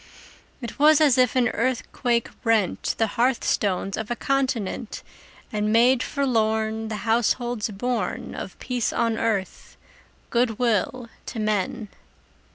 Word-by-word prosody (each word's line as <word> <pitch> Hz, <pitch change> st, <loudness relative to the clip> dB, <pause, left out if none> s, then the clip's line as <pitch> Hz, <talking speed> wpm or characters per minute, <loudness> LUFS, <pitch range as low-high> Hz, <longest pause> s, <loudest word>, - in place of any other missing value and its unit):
It 235 Hz, +3 st, -7 dB
was 305 Hz, +1 st, +6 dB
as 280 Hz, -5 st, +4 dB
if 250 Hz, -1 st, +3 dB
an 245 Hz, -2 st, +3 dB
earthquake 240 Hz, 0 st, -1 dB, 0.2 s
rent 220 Hz, -5 st, +1 dB
The 225 Hz, -, +3 dB
hearth 240 Hz, +3 st, 0 dB
stones 195 Hz, -1 st, 0 dB
of 220 Hz, -, -5 dB
a 240 Hz, -, -1 dB
continent, 255 Hz, -5 st, -2 dB, 0.5 s
And 210 Hz, 0 st, 0 dB
made 240 Hz, +3 st, +4 dB
forlorn 220 Hz, -5 st, 0 dB
The 220 Hz, -, -4 dB
households 235 Hz, 0 st, +1 dB
born 240 Hz, +4 st, -3 dB
Of -, -, -7 dB
peace 250 Hz, -3 st, -2 dB
on 230 Hz, -1 st, 0 dB
earth, 215 Hz, -4 st, -2 dB, 0.5 s
good 235 Hz, -2 st, +1 dB
will 235 Hz, +1 st, 0 dB, 0.2 s
to 225 Hz, -, -5 dB
men! 215 Hz, 0 st, -1 dB
230 Hz, 130 wpm, -24 LUFS, 215-250 Hz, 0.5 s, was